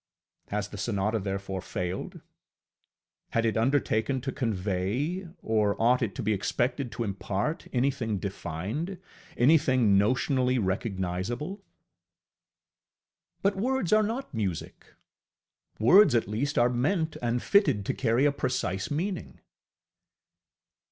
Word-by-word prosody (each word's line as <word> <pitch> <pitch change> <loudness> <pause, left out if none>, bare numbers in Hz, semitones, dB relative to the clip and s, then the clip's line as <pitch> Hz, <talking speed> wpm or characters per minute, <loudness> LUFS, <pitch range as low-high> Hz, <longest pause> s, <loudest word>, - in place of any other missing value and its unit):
Has 105 0 -3
the 105 - -8
sonata 105 +1 0
therefore 95 -1 -4
failed? 90 -1 -4 1.1
Had 115 0 +2
it 110 -3 +1
undertaken 130 0 +1
to 135 +2 -3
convey, 110 - -2 0.2
or 105 -2 +1
ought 125 +3 +4
it 110 -5 -1
to 130 - -4
be 110 +1 +2
expected 120 +5 -1
to 120 - -2
impart 100 - -3
anything 125 -4 0
defined, 100 - -4 0.4
anything 130 -7 +4
notionally 130 +4 +2
recognizable? 100 - -2 1.8
ŌĆ£But 200 0 +2
words 245 -2 0
are 215 - +6
not 225 - -3
music; 100 -7 -4 0.8
words 175 - +6
at 115 - +2
least 125 +8 -2
are 120 - +5
meant 155 +6 0
and 120 0 -1
fitted 200 - +3
to - - 0
carry 125 +1 +2
a 145 - +4
precise 95 -9 -2
meaning! 180 +6 -3
120 Hz, 115 wpm, -28 LUFS, 100-145 Hz, 1.8 s, are